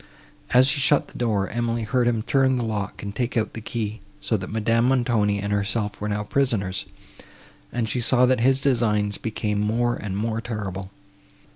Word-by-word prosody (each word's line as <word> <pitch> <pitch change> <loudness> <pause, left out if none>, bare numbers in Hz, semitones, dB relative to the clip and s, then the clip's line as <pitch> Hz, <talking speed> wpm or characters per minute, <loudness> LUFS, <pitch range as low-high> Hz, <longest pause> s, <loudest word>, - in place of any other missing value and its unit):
As 130 +3 +5
he 155 - -1
shut 140 +1 +3
the - - -11
door, 105 -5 +1
Emily 115 -1 -1
heard 120 +3 +1
him 115 -2 +1
turn 135 0 +2
the 120 -2 -1
lock 105 -3 -4
and 100 -1 -5
take 120 -1 -1
out 110 - 0
the 115 - -6
key; 110 -2 -4 0.2
so 110 - -1
that 95 -2 -4
Madame 115 +2 +1
Montoni 120 -6 +2
and 100 0 -2
herself 105 +1 -1
were 105 - -2
now 105 0 -1
prisoners; 105 -6 0 0.9
and 120 -2 -1
she 125 +3 -1
saw 125 +1 +4
that 125 -1 +2
his 130 +3 +3
designs 105 -6 +1
became 105 -2 -2
more 120 +3 +1
and 100 -2 -4
more 115 +1 -1
terrible. 95 -5 -5
115 Hz, 185 wpm, -24 LUFS, 105-120 Hz, 0.9 s, As